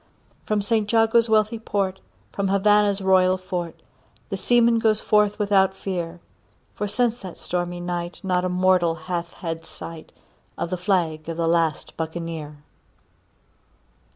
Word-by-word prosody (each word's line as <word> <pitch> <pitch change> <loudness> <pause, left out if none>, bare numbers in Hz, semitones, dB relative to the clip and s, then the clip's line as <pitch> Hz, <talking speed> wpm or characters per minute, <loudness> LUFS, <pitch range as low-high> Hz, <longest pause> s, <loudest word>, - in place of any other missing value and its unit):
From 210 -1 +1
St 210 0 0
Jago's 230 0 +4
wealthy 215 +1 +2
port, 195 -3 -2 0.3
from 200 -1 -1
Havannah's 200 0 +3
royal 185 -1 +4
fort, 175 -3 -5 0.5
The - - -2
seaman 235 +3 +3
goes 220 -1 +3
forth 210 -1 +2
without 195 -2 +3
fear; 175 -3 -4 0.5
For 210 - -3
since 240 +2 0
that 185 -3 -8
stormy 175 0 -3
night 175 0 -4
not 180 -1 +1
a 185 - 0
mortal 180 -2 +3
hath 170 +1 -4
had 165 -3 -6
sight 165 -1 -10 0.5
Of 170 - -3
the - - +1
flag 170 -4 0
of 165 - -4
the 165 -1 0
last 165 -2 0
Buccaneer. 160 -2 -5
185 Hz, 140 wpm, -23 LUFS, 170-210 Hz, 0.5 s, Jago's